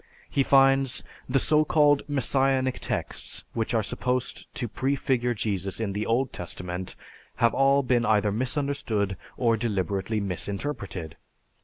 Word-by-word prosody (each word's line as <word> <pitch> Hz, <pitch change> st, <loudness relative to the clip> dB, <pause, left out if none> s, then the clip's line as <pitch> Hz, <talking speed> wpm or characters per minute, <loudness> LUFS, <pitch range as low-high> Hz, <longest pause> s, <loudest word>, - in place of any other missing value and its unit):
He 140 Hz, -, +2 dB
finds, 135 Hz, -1 st, +4 dB, 0.3 s
"The 130 Hz, -, +3 dB
so 150 Hz, +3 st, +3 dB
called 145 Hz, -2 st, +4 dB
Messianic 135 Hz, -1 st, +1 dB
texts -, -, -3 dB
which 115 Hz, 0 st, -1 dB
are 110 Hz, -, +2 dB
supposed 125 Hz, +4 st, -2 dB
to 120 Hz, -, -2 dB
prefigure 125 Hz, 0 st, 0 dB
Jesus 100 Hz, -3 st, -1 dB
in 105 Hz, -3 st, -2 dB
the 105 Hz, +2 st, -2 dB
Old 125 Hz, +4 st, +1 dB
Testament 90 Hz, +1 st, -4 dB, 0.4 s
have 115 Hz, -1 st, +3 dB
all 140 Hz, +1 st, +4 dB
been 125 Hz, -2 st, +2 dB
either 105 Hz, -2 st, +3 dB
misunderstood 125 Hz, -4 st, -1 dB, 0.2 s
or 115 Hz, -2 st, +2 dB
deliberately 100 Hz, -1 st, -1 dB
misinterpreted. 100 Hz, -, -3 dB
120 Hz, 130 wpm, -26 LUFS, 100-135 Hz, 0.4 s, finds